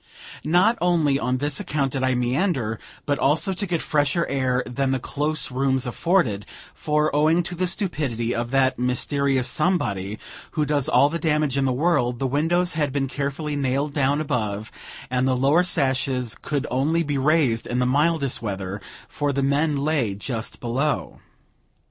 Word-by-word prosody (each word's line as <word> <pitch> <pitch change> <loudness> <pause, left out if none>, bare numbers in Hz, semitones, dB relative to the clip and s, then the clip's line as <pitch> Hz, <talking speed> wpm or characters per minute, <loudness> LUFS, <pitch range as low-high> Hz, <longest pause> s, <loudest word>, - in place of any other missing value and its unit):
Not 185 +9 +3
only 160 -6 +2
on 125 0 0
this 145 +1 -2
account 140 -3 -1
did 135 - -2
I 130 -1 +2
meander, 125 - 0 0.3
but 145 -1 0
also 160 +8 +2
to 195 +2 -1
get 170 -2 -1
fresher 150 +3 +1
air 130 -2 0
than 135 +2 -1
the 130 0 0
close 150 +2 -2
rooms 130 0 0
afforded; 125 - +1 0.3
for, 150 -1 0
owing 160 +4 +3
to 175 - -5
the 180 +1 -1
stupidity 140 - -1
of 120 0 -2
that 130 -1 +2
mysterious 130 +1 0
"somebody" 105 - 0 0.4
who 150 - +1
does 145 -3 0
all 140 - +5
the 170 +2 -3
damage 150 -4 +1
in 140 -1 +1
the 130 - +2
world, 125 -3 +1
the 135 - -2
windows 165 +7 +1
had 150 -3 0
been 135 0 -1
carefully 145 +2 -3
nailed 140 +1 -1
down 140 0 +1
above, 110 -7 -2 0.4
and 125 +1 +1
the 130 -1 +2
lower 140 +7 +4
sashes 130 -6 0
could 145 -1 -2
only 150 +7 +1
be 145 -3 -1
raised 135 -5 +2
in 120 - -2
the 125 - +2
mildest 145 +1 +1
weather, 100 -2 -4 0.3
for 145 -1 -2
the 140 0 -1
men 145 +2 +1
lay 140 -8 0
just 115 +2 -5
below. 130 +5 -2
140 Hz, 170 wpm, -23 LUFS, 125-155 Hz, 0.4 s, all